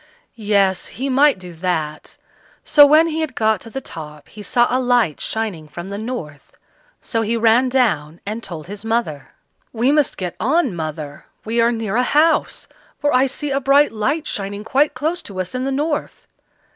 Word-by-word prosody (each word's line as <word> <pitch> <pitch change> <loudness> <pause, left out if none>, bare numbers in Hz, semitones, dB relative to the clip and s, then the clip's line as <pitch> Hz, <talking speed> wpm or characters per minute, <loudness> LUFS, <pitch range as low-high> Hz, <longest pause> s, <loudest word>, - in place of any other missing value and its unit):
Yes! 200 -4 +1
he 270 +3 -4
might 280 0 +4
do 180 -2 -10
that; 160 -3 -3 0.5
so 295 -2 +7
when 310 +3 +6
he 320 -1 -2
had 310 -5 -3
got 220 -3 +1
to 230 - -9
the 270 - -5
top 150 - -10
he 215 - -11
saw 240 +3 +2
a 255 - 0
light 245 - +1
shining 210 -9 -4
from 175 +5 -8
the 200 - -5
north. 215 - -7 0.4
So 225 - -2
he 225 +1 0
ran 230 +3 +4
down 175 - 0
and 215 +3 -4
told 165 -8 -7
his 205 +2 -8
mother. 225 -11 -2 0.4
"We 240 +4 +1
must 295 -2 +2
get 180 -2 -4
on, 270 - +1
mother; 155 -3 -6 0.2
we 230 +2 +1
are 235 +1 +3
near 225 -2 -2
a - - +4
house, 300 +6 +2 0.3
for 290 - 0
I 255 +2 +4
see 285 +2 -3
a 275 - +1
bright 280 +2 +4
light 270 +9 -1
shining 200 +1 -4
quite 275 +7 +1
close 330 +4 -2
to 195 -2 -8
us 185 +4 -3
in 255 +1 -2
the 275 - -1
north." 295 +2 -3
225 Hz, 190 wpm, -20 LUFS, 185-270 Hz, 0.5 s, so